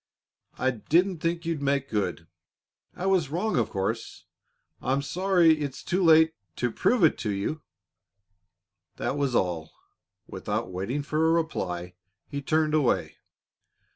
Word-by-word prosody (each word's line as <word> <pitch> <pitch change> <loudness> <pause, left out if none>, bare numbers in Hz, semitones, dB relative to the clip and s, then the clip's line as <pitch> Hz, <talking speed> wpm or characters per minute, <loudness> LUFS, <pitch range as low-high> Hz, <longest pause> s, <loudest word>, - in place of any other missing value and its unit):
I 130 - +1
I - - +1
didn't 170 - +1
think 165 +1 -1
you'd 165 -3 -2
make 140 -1 0
good. 95 -7 -2 0.7
I 180 - -5
was 185 -7 +2
wrong, 180 +8 -1
of 115 -4 +1
course. 110 +3 -3 0.6
I 130 - 0
I'm 140 +1 0
sorry 175 -1 +3
it's 140 -3 -4
too 185 +2 0
late 160 -1 +6 0.2
to 125 -1 -1
prove 240 - +2
it 160 - +4
to 110 - -2
you." 100 +10 -2 1.3
That - - -2
was 140 -4 0
all. 85 -5 -1 0.5
Without - - -4
waiting 115 +11 -3
for 155 +2 +1
a - - +4
reply, 90 - -2 0.3
he 140 - -4
turned 155 +2 +1
away. 150 -6 +1
145 Hz, 145 wpm, -27 LUFS, 115-165 Hz, 1.3 s, late